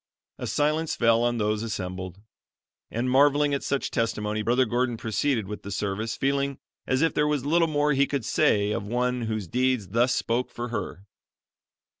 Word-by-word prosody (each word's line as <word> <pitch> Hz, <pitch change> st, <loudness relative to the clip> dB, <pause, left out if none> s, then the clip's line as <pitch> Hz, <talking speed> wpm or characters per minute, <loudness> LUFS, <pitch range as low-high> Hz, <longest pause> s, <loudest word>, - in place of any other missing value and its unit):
"] -, -, -68 dB
A -, -, -4 dB
silence 155 Hz, +2 st, 0 dB
fell 115 Hz, -1 st, +3 dB
on 120 Hz, 0 st, +1 dB
those 105 Hz, -1 st, 0 dB
assembled, 95 Hz, -3 st, -5 dB, 0.7 s
and, 120 Hz, +3 st, -2 dB
marveling 145 Hz, +2 st, +4 dB
at 140 Hz, -, 0 dB
such 140 Hz, -1 st, -2 dB
testimony, 110 Hz, -2 st, -1 dB
Brother 120 Hz, +4 st, +2 dB
Gordon 120 Hz, +1 st, 0 dB
proceeded 115 Hz, 0 st, -1 dB
with 105 Hz, +1 st, -6 dB
the 100 Hz, -, -8 dB
service 100 Hz, +3 st, -2 dB
feeling 140 Hz, 0 st, 0 dB, 0.3 s
as 130 Hz, +4 st, +2 dB
if 165 Hz, -, +2 dB
there 150 Hz, 0 st, +2 dB
was 145 Hz, -3 st, -1 dB
little 165 Hz, +3 st, +3 dB
more 150 Hz, -1 st, +1 dB
he 140 Hz, 0 st, +3 dB
could 140 Hz, -6 st, -2 dB
say 105 Hz, 0 st, +2 dB
of 100 Hz, -1 st, -3 dB
one 125 Hz, +2 st, 0 dB
whose 110 Hz, -4 st, -3 dB
deeds 125 Hz, -3 st, 0 dB
thus 120 Hz, +5 st, +2 dB
spoke 120 Hz, +2 st, -1 dB
for 120 Hz, 0 st, -5 dB
her. 100 Hz, -4 st, -5 dB
120 Hz, 180 wpm, -26 LUFS, 105-140 Hz, 0.7 s, marveling